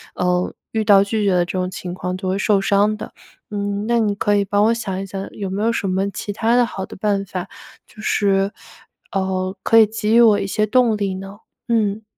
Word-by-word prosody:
呃， 180 Hz, 0 st, 0 dB, 0.2 s
遇 220 Hz, -1 st, 0 dB
到 200 Hz, -2 st, +6 dB
拒 210 Hz, +1 st, -1 dB
绝 195 Hz, -, +3 dB
的 180 Hz, -1 st, +3 dB
这 -, -, -6 dB
种 180 Hz, 0 st, -1 dB
情 180 Hz, -1 st, -6 dB
况 180 Hz, 0 st, -4 dB
就 190 Hz, 0 st, -5 dB
会 190 Hz, -, 0 dB
受 205 Hz, -1 st, +2 dB
伤 205 Hz, +2 st, +2 dB
的， -, -, -8 dB, 0.4 s
嗯， 205 Hz, 0 st, -2 dB
那 235 Hz, 0 st, +2 dB
你 210 Hz, -2 st, +1 dB
可 205 Hz, 0 st, +1 dB
以 200 Hz, -, +1 dB
帮 205 Hz, +1 st, +2 dB
我 225 Hz, -, +4 dB
想 195 Hz, -5 st, -4 dB
一 195 Hz, -, -5 dB
想 195 Hz, 0 st, -6 dB
有 195 Hz, -2 st, -5 dB
没 195 Hz, +2 st, -3 dB
有 230 Hz, -, +2 dB
什 205 Hz, -3 st, -2 dB
么 190 Hz, +2 st, 0 dB
其 205 Hz, -, -5 dB
它 230 Hz, +3 st, +1 dB
的 245 Hz, -, +4 dB
好 195 Hz, -4 st, -5 dB
的 -, -, -11 dB
办 200 Hz, 0 st, 0 dB
法， 185 Hz, -1 st, -5 dB, 0.4 s
就 215 Hz, -, -14 dB
是， 195 Hz, -2 st, +1 dB, 0.6 s
呃， 190 Hz, 0 st, -2 dB
可 225 Hz, -, +4 dB
以 220 Hz, -, +8 dB
给 215 Hz, +1 st, -1 dB
予 235 Hz, -, +7 dB
我 220 Hz, -3 st, +5 dB
一 -, -, -3 dB
些 215 Hz, +2 st, 0 dB
动 235 Hz, 0 st, +3 dB
力 200 Hz, -2 st, -1 dB
呢？ 195 Hz, +2 st, -9 dB, 0.3 s
嗯。 220 Hz, -2 st, 0 dB
200 Hz, 250 characters per minute, -20 LUFS, 190-215 Hz, 0.6 s, 以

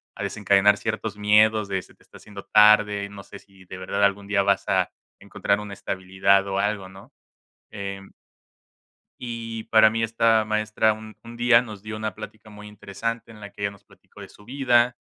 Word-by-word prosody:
a -, -, -6 dB
desencadenar 100 Hz, 0 st, +3 dB
ciertos 110 Hz, -2 st, -4 dB
miedos 105 Hz, 0 st, +3 dB
de: 95 Hz, -1 st, -2 dB
"Se -, -, -20 dB
te -, -, -27 dB
está -, -, -22 dB
haciendo 100 Hz, -2 st, -12 dB
tarde, 105 Hz, -1 st, +5 dB
no 100 Hz, -1 st, -11 dB
sé -, -, -12 dB
si 95 Hz, -1 st, -21 dB
de 95 Hz, -, -9 dB
verdad 95 Hz, +2 st, -2 dB
algún 100 Hz, 0 st, +1 dB
día 100 Hz, -1 st, +1 dB
vas 100 Hz, -1 st, +1 dB
a -, -, +1 dB, 0.3 s
encontrar 100 Hz, +1 st, -2 dB
una 105 Hz, -1 st, -8 dB
estabilidad 95 Hz, +1 st, 0 dB
o 95 Hz, 0 st, -2 dB
algo", 105 Hz, -2 st, -2 dB
¿no?, 95 Hz, +1 st, -15 dB, 0.6 s
em 100 Hz, -1 st, -7 dB, 1.1 s
y 115 Hz, -2 st, -6 dB
para 110 Hz, -1 st, +5 dB
mí, 115 Hz, +1 st, -2 dB
esta 115 Hz, -1 st, +2 dB
maestra 110 Hz, 0 st, +1 dB
un 110 Hz, 0 st, -12 dB
un 115 Hz, 0 st, -11 dB
día 120 Hz, 0 st, +5 dB
nos 105 Hz, -5 st, -9 dB
dio 110 Hz, 0 st, -7 dB
una 110 Hz, 0 st, -4 dB
plática 110 Hz, 0 st, -11 dB
muy 105 Hz, 0 st, -12 dB
interesante 110 Hz, +3 st, -6 dB
en 110 Hz, -, -13 dB
la 105 Hz, -1 st, -9 dB
que -, -, -17 dB
ella 100 Hz, -, 0 dB
nos 100 Hz, -, -18 dB
platicó -, -, -17 dB
de -, -, -12 dB
su 105 Hz, -, -19 dB
vida, 125 Hz, -2 st, +2 dB
105 Hz, 195 wpm, -24 LUFS, 100-110 Hz, 1.1 s, tarde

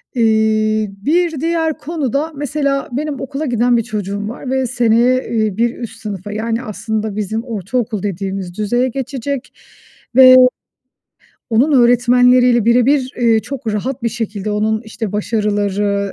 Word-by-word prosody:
Eee, 220 Hz, -2 st, +2 dB
bir 325 Hz, -, 0 dB
diğer 325 Hz, -1 st, 0 dB
konu 295 Hz, -5 st, -4 dB
da 305 Hz, +4 st, -1 dB
mesela 280 Hz, -1 st, -2 dB
benim 285 Hz, +2 st, -3 dB
okula 275 Hz, +3 st, -4 dB
giden 245 Hz, -1 st, +2 dB
bir 230 Hz, -, 0 dB
çocuğum 205 Hz, -1 st, -4 dB
var 245 Hz, +3 st, -7 dB
ve 265 Hz, -1 st, 0 dB
seneye, 245 Hz, +1 st, +2 dB
eee, 215 Hz, -4 st, -1 dB
bir 235 Hz, +1 st, +1 dB
üst 225 Hz, -2 st, -8 dB
sınıfa 205 Hz, -2 st, -6 dB
yani 225 Hz, +3 st, -2 dB
aslında 215 Hz, 0 st, -4 dB
bizim 220 Hz, +2 st, -3 dB
ortaokul 225 Hz, -1 st, -3 dB
dediğimiz 190 Hz, -2 st, -4 dB
düzeye 240 Hz, +5 st, +1 dB
geçecek 270 Hz, +1 st, -4 dB, 0.6 s
ve 255 Hz, -1 st, +9 dB, 1.2 s
onun 245 Hz, +7 st, +3 dB
öğretmenleriyle 245 Hz, -1 st, +4 dB
bire 235 Hz, +1 st, +4 dB
bir, 270 Hz, -2 st, +1 dB
eee, 230 Hz, -2 st, +3 dB
çok 255 Hz, -4 st, -5 dB
rahat 255 Hz, +4 st, -3 dB
bir 235 Hz, -, +1 dB
şekilde 215 Hz, -3 st, -4 dB
onun, 215 Hz, +1 st, 0 dB
işte, 220 Hz, -2 st, -6 dB
başarıları, 205 Hz, -2 st, -1 dB
230 Hz, 140 wpm, -17 LUFS, 215-260 Hz, 1.2 s, ve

